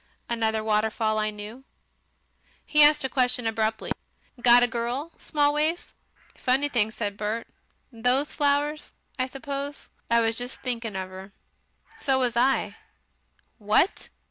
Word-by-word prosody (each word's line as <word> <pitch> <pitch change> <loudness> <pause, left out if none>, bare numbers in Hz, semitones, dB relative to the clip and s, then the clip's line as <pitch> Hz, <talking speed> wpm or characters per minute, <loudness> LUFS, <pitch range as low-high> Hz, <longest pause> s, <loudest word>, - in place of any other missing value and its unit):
"Another 220 -2 0
waterfall 215 0 +1
I 215 0 +1
knew." 210 +5 -9 1.0
He 300 - +4
asked 295 0 +6
a - - +1
question 250 -2 +1
abruptly. 220 0 -1 0.5
"Got 240 0 +7
a - - +4
girl, 245 +7 -3
Smallways?" 300 +3 0 0.4
"Funny 270 +3 +1
thing," 230 -6 +2
said 210 -2 -4
Bert, 215 +2 -2 0.5
"those 250 +5 +1
flowers, 290 +1 0 0.3
I 255 - +1
suppose. 280 +1 -6 0.2
I 235 0 +4
was 225 0 0
jes' 245 +1 -5
thinking 235 -4 -4
of 185 -1 -4
'er." 190 +1 -10 0.6
"So 270 -2 +1
was 250 -3 0
I." 265 +3 +1 0.8
"WHAT! 215 - +1
240 Hz, 130 wpm, -26 LUFS, 220-275 Hz, 1.0 s, Got